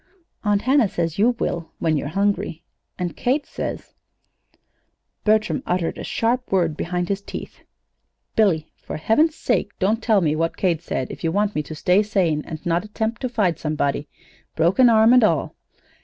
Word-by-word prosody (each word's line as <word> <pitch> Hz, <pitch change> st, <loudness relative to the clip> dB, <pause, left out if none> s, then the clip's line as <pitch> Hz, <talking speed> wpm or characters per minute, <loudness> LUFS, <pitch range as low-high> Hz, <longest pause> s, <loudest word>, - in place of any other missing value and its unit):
"Aunt 205 Hz, -1 st, +1 dB
Hannah 260 Hz, -2 st, +4 dB
says 165 Hz, 0 st, -2 dB
you 240 Hz, +4 st, +4 dB
will 170 Hz, -7 st, -3 dB
when 160 Hz, -2 st, +1 dB
you're 145 Hz, -, -2 dB
hungry. 195 Hz, -1 st, -1 dB, 0.3 s
And 175 Hz, -4 st, -3 dB
Kate 275 Hz, +4 st, 0 dB
said -, -, -5 dB, 0.7 s
" -, -, -45 dB
Bertram 215 Hz, -7 st, +2 dB
uttered 175 Hz, -2 st, -1 dB
a -, -, -5 dB
sharp 245 Hz, +2 st, -1 dB
word 170 Hz, -5 st, +2 dB
behind 175 Hz, +2 st, -2 dB
his 200 Hz, +1 st, -2 dB
teeth. -, -, -8 dB, 0.8 s
"Billy, 170 Hz, -8 st, +2 dB
for -, -, -7 dB
heaven's 300 Hz, -, +2 dB
sake 205 Hz, -, -1 dB
don't 215 Hz, +4 st, +1 dB
tell 220 Hz, -3 st, +3 dB
me 155 Hz, -3 st, +1 dB
what 165 Hz, +1 st, -1 dB
Kate 170 Hz, -4 st, +1 dB
said, 130 Hz, -6 st, -3 dB
if -, -, -10 dB
you 165 Hz, -, +1 dB
want 205 Hz, +3 st, +1 dB
me 150 Hz, -, 0 dB
to 155 Hz, +1 st, -8 dB
stay 180 Hz, +6 st, +3 dB
sane, 185 Hz, -8 st, 0 dB
and 160 Hz, -2 st, -7 dB
not 170 Hz, +1 st, +1 dB
attempt 220 Hz, +2 st, -3 dB
to 255 Hz, -, -1 dB
fight 205 Hz, -8 st, 0 dB
somebody 150 Hz, -1 st, -1 dB, 0.5 s
broken 185 Hz, +10 st, +4 dB
arm, 225 Hz, +1 st, +6 dB
and 250 Hz, -2 st, +6 dB
all. 215 Hz, -, +1 dB
190 Hz, 175 wpm, -22 LUFS, 165-220 Hz, 0.8 s, arm